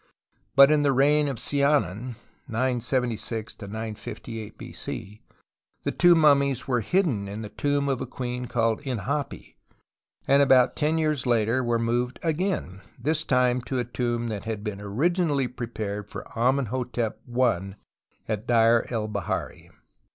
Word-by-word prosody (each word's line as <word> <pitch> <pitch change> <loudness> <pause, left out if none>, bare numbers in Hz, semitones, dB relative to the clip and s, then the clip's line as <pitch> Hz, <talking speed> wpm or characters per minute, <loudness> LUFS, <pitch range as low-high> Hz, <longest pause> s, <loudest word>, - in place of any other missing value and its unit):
But 140 +2 +8
in 150 -1 +4
the 140 -1 +3
reign 145 +3 +4
of 135 -4 -3
Siamon 130 - +1 0.3
(97G 120 -2 -2
958 110 0 -7
b.c.) 105 +2 -8 0.6
the - - 0
two 175 0 +5
mummies 140 -4 +3
were 125 -2 +2
hidden 135 - +1
in 105 +3 -6
the 105 - -6
tomb 145 +5 0
of 135 -2 -1
a 130 - -3
queen 125 0 -4
called 115 -2 0
Inhapi, 125 -9 -4 0.7
and 140 +1 +5
about 130 -2 +5
ten 155 +2 +1
years 155 -5 0
later 120 +2 +2
were 120 -1 +1
moved 120 +2 -1
again, 165 - -1 0.2
this 155 +5 -1
time 125 -2 +2
to 130 +2 -4
a 125 - +1
tomb 120 0 -2
that 105 -1 -5
had 110 -2 -4
been 105 -2 -5
originally 145 - +1
prepared 110 -5 -5
for - - -7
Amenhotep 125 -2 0 0.2
I 100 -6 +1 0.5
at 110 +1 -3
Deir 115 -1 +4
el 110 -3 -2
Bahari. 100 -5 -4
125 Hz, 140 wpm, -26 LUFS, 110-140 Hz, 0.7 s, But